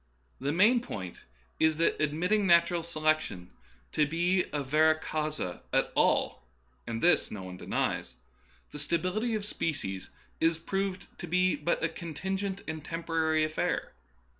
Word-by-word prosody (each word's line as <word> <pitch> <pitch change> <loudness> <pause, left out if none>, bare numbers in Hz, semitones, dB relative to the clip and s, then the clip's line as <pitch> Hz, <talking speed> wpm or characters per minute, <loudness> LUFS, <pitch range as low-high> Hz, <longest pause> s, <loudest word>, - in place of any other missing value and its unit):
The 140 +2 -1
main 215 +9 +5
point 95 - -7 0.3
is 160 -1 +3
that, 165 - +1
admitting 180 +8 +1
nat 170 -1 +6
ural 175 -1 0
selection 155 - -1 0.4
to 150 -2 +2
be 175 +4 +2
a 145 -1 -1
vera 155 +3 +4
causa 150 - -3
at - - +2
all - - +2 0.5
(and 115 0 -3
this 175 - +4
no 100 -3 -6
one 90 0 -7
denies), 65 - -2 0.6
the 150 - -7
stability 185 - 0
of 210 -2 -2
species 135 - -3 0.3
is 165 0 +3
proved 195 +3 -2
to 175 - -5
be 180 +2 +3
but 170 - -1
a - - +4
contingent 190 +5 -4
and 155 -1 -4
temporary 160 -1 0
affair. 155 0 -1
165 Hz, 145 wpm, -30 LUFS, 150-180 Hz, 0.6 s, nat